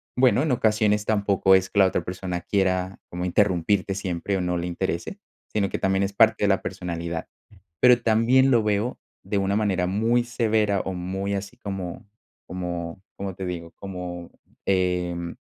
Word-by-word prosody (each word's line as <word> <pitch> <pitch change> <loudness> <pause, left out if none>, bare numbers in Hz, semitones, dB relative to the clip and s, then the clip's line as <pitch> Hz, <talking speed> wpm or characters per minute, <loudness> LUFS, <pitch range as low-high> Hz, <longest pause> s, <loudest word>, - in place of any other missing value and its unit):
bueno, 125 -1 +4
en 155 - 0
ocasiones 105 -3 +2
tampoco 100 -2 +3
es 95 0 +2
que 100 - 0
la 95 - +7
otra 90 -2 -2
persona 90 -1 -4
quiera 95 -1 0
como 90 +1 -4
interrumpirte 95 +1 +1
siempre 95 0 -2
o - - -1
no 90 0 -1
le 85 +1 -2
interese, 90 - -3 0.3
sino 100 -2 0
que - - -3
también 95 0 +1
es 100 0 -2
parte 110 +1 +4
de - - +3
la 95 -1 +2
personalidad. 85 -3 -4 0.5
Pero 125 -1 +6
también 120 +4 +4
lo 115 -3 +4
veo 105 +3 0 0.2
de 100 - -2
una 100 0 +1
manera 95 -4 +1
muy 115 +6 +2
severa 110 -4 +1
o 95 - -4
muy 95 +3 -3
así 100 +4 -5
como 95 -7 -6 0.4
como 85 -1 -5
¿como 100 -1 -5
te 95 - -5
digo?, 85 -2 -5
como, 90 -3 -6 0.4
em 90 -2 0
95 Hz, 170 wpm, -25 LUFS, 90-105 Hz, 0.5 s, la